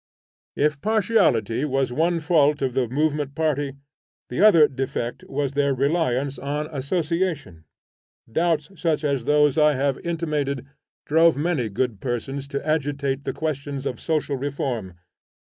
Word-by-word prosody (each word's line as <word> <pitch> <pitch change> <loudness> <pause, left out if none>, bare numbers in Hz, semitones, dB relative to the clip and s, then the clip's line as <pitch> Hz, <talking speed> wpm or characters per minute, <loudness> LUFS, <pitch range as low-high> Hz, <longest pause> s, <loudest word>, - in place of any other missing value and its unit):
If 150 -1 +1
partiality 195 - +2
was 135 -3 0
one 165 +4 +1
fault 150 -2 +3
of 130 -2 0
the 130 -1 +1
movement 145 +2 -1
party, 145 -4 -1 0.5
the 125 - -2
other 170 -8 +7
defect 130 -3 -4
was 140 -1 -2
their 140 -1 +1
reliance 140 -1 0
on 145 +2 -2
Association. 155 - -2 0.7
Doubts 160 - 0
such 160 -3 +1
as 140 -5 0
those 150 0 +3
I 150 0 +5
have 135 0 0
intimated 150 -6 -2 0.4
drove 165 0 +4
many 150 -7 0
good 110 +1 -2
persons 135 +2 -3
to 140 +1 -5
agitate 140 -2 -1
the - - -1
questions 140 -2 -4
of 125 -4 -3
social 150 -3 -1
reform. 125 -8 -3
145 Hz, 135 wpm, -23 LUFS, 135-155 Hz, 0.7 s, other